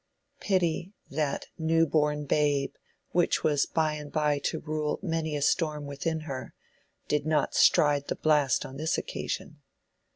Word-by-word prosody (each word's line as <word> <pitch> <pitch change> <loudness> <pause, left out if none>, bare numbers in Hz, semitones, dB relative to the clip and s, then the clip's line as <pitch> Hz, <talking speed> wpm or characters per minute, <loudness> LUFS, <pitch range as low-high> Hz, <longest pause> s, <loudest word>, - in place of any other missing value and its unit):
Pity, 185 -1 0 0.2
that 145 -1 -1
"new 165 +1 +3
born 150 -1 +1
babe" 145 -1 +1 0.4
which 175 -1 +2
was 145 -2 +2
by 155 -1 +1
and 150 -1 -7
by 150 -2 +1
to - - 0
rule 155 -1 -2
many 160 -4 -1
a 145 - -1
storm 150 -2 +1
within 155 +3 -3
her, 135 -5 -6 0.5
did 150 -1 +1
not 155 -1 +1
"stride 145 -1 +4
the - - -1
blast" 150 -4 +2
on 135 - -8
this 160 +2 0
occasion. - - -5
150 Hz, 150 wpm, -28 LUFS, 145-160 Hz, 0.5 s, stride